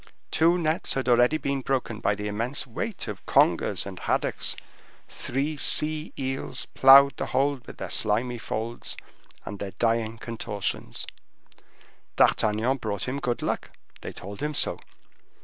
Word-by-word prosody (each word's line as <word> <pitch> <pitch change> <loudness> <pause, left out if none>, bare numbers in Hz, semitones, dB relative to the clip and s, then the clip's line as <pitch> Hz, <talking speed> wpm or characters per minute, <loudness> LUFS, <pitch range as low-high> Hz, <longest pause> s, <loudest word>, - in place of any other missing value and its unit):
Two 170 +2 +4
nets 160 -1 0
had 135 -2 -2
already 125 +5 +4
been 140 -2 -2
broken 130 -4 -2
by 105 - +1
the 105 0 -4
immense 115 +7 -2
weight 180 - -4
of 105 -3 -6
congers - - +3
and - - -7
haddocks; - - 0 0.5
three 145 +4 -3
sea 155 +2 +2
eels 135 -1 -3
plowed 135 0 +7
the - - -3
hold 135 0 0
with - - -10
their - - -5
slimy 115 +3 +1
folds 115 +2 -5 0.5
and 100 - -6
their 100 -1 -5
dying 115 -1 0
contortions. 110 -3 -4 1.1
D'Artagnan 110 +5 +3
brought 105 -6 -4
them 130 +2 -2
good 125 -2 -2
luck; - - -3 0.2
they - - -6
told 100 +2 -9
him 150 0 -2
so. - - +1
125 Hz, 145 wpm, -26 LUFS, 110-140 Hz, 1.1 s, plowed